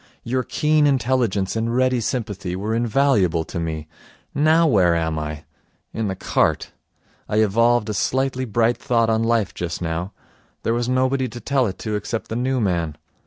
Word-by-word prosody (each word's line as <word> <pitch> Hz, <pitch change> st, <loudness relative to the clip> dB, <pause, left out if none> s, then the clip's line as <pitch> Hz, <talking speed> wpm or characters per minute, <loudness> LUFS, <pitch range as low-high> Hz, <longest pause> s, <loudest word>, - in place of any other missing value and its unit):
Your 130 Hz, +2 st, 0 dB
keen 150 Hz, +3 st, +2 dB
intelligence 120 Hz, -8 st, +1 dB
and 115 Hz, +1 st, -1 dB
ready 130 Hz, -1 st, +2 dB
sympathy 105 Hz, -6 st, -3 dB
were 105 Hz, +4 st, -2 dB
invaluable 115 Hz, -, +2 dB
to 85 Hz, -, -6 dB
me. 80 Hz, -2 st, -4 dB, 0.5 s
Now 155 Hz, +3 st, +4 dB
where 95 Hz, -, +4 dB
am 80 Hz, -1 st, -1 dB
I? 75 Hz, 0 st, -5 dB, 0.5 s
In 110 Hz, -1 st, -2 dB
the 95 Hz, -, -2 dB
cart. -, -, 0 dB, 0.6 s
I -, -, -1 dB
evolved 115 Hz, +2 st, +3 dB
a 105 Hz, -, -2 dB
slightly 130 Hz, +4 st, 0 dB
bright 115 Hz, +1 st, +1 dB
thought 115 Hz, -3 st, +1 dB
on 110 Hz, 0 st, +1 dB
life 115 Hz, -3 st, +1 dB
just 85 Hz, -1 st, -4 dB
now. 85 Hz, +3 st, -3 dB, 0.5 s
There 115 Hz, -, +1 dB
was 120 Hz, +1 st, -1 dB
nobody 130 Hz, +1 st, +1 dB
to 120 Hz, +1 st, -8 dB
tell 135 Hz, -1 st, +1 dB
it 95 Hz, -, -5 dB
to 110 Hz, -, -2 dB
except 110 Hz, +2 st, -4 dB
the 110 Hz, -, -3 dB
new 130 Hz, +2 st, 0 dB
man. 85 Hz, -7 st, -1 dB
115 Hz, 170 wpm, -22 LUFS, 95-130 Hz, 0.6 s, Now